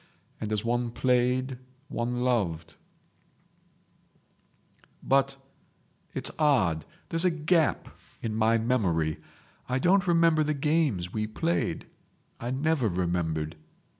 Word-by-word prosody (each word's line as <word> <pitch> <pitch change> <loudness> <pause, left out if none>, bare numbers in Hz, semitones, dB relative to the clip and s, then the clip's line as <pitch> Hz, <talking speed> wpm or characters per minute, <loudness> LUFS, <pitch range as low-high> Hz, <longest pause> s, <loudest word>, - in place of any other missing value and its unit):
And 110 -1 -4
as 105 +1 -1
one 120 0 0
played 125 +1 +1 0.3
one 120 0 -2
loved.... 85 -10 0 2.3
"But—it's 135 0 -3
odd—there's 135 - +1
a 180 - +5
gap 160 -1 +1 0.4
in 110 - -2
my 110 +1 +3
memory. 95 -10 0 0.5
I 125 - +1
don't 180 +6 +3
remember 165 -2 +4
the 150 0 0
games 140 - 0
we 110 -1 -1
played. 165 +10 -1 0.5
I 120 - -4
never 140 -1 +1
remembered. 85 -4 -1
125 Hz, 100 wpm, -28 LUFS, 105-150 Hz, 2.3 s, a